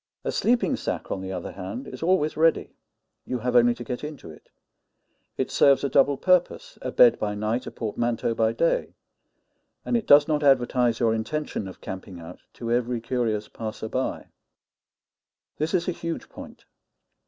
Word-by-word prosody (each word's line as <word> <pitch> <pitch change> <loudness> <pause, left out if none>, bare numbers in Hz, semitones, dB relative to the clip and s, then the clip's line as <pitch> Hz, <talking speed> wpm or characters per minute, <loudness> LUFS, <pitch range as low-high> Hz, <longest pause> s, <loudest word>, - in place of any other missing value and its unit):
A - - -1
sleeping 240 +1 +1
sack, - - -4
on 95 - -2
the 95 0 -5
other 90 -2 -5
hand, 105 +9 -7
is - - -9
always 165 -3 +1
ready 160 +1 +2 0.5
you 125 - -3
have 125 +1 -2
only 120 0 +5
to 120 - -8
get 125 +3 -5
into 150 - -8
it; 75 - -17 0.9
it - - -2
serves 140 -1 +4
a 140 - 0
double 140 +1 +3
purpose 180 +4 +1
a - - -4
bed 120 - +6
by 105 -1 -2
night, 110 +4 -2
a - - -5
portmanteau 115 +1 -2
by 115 0 +1
day; 165 +9 0 0.9
and 245 - 0
it 230 - -1
does 145 0 +7
not 155 -2 0
advertise 125 -4 +3
your 115 -2 +2
intention 115 -1 -3
of 95 - -11
camping 95 -1 -8
out 85 +2 -10
to 115 -1 -5
every 120 0 0
curious 115 -3 -2
passer 110 0 -6
by. 130 +3 -3 1.3
This 155 +2 -1
is 175 -2 0
a - - +1
huge 170 -1 -5
point. - - -12
120 Hz, 175 wpm, -25 LUFS, 110-150 Hz, 1.3 s, does